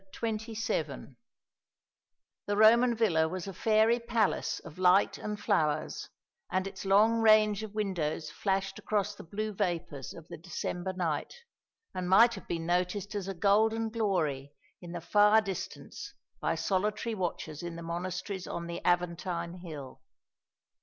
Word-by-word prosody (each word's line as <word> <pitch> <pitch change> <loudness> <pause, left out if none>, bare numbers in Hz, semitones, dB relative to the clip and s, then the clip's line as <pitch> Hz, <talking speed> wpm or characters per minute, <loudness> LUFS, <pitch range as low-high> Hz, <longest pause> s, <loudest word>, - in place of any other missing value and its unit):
CHAPTER 230 - -2 0.2
XXVII 210 - -2 1.4
The 205 0 0
Roman 235 +3 +6
villa 170 -8 +3
was 185 +2 -5
a 195 - -5
fairy 220 +4 +3
palace 235 -3 0
of 165 0 -12
light 185 +2 +4
and 210 -1 -4
flowers, 155 -1 0 0.4
and 185 +1 0
its 195 0 -7
long 215 +4 +4
range 215 -2 +5
of 215 -1 -8
windows 165 -7 -2
flashed 195 +2 -1
across 205 -1 -1
the - - -11
blue 215 +5 -4
vapours 170 -8 -3
of 165 -2 -12
the - - -8
December 175 +2 -4
night, 165 -5 -2 0.6
and 180 -1 -3
might 230 +5 +7
have - - -9
been 165 -1 -3
noticed 180 +4 -1
as 200 -2 -3
a 195 - -4
golden 220 +4 +2
glory 160 - -1 0.3
in 175 -1 -9
the 175 -1 -5
far 210 +5 +5
distance 195 -4 -6 0.2
by - - 0
solitary 205 +7 -1
watchers 170 -6 -4
in 170 -1 -5
the 170 - -7
monasteries 180 +2 -4
on 170 - -4
the 170 0 -5
Aventine 175 0 -1
hill. 150 -7 -9
190 Hz, 145 wpm, -30 LUFS, 170-215 Hz, 1.4 s, might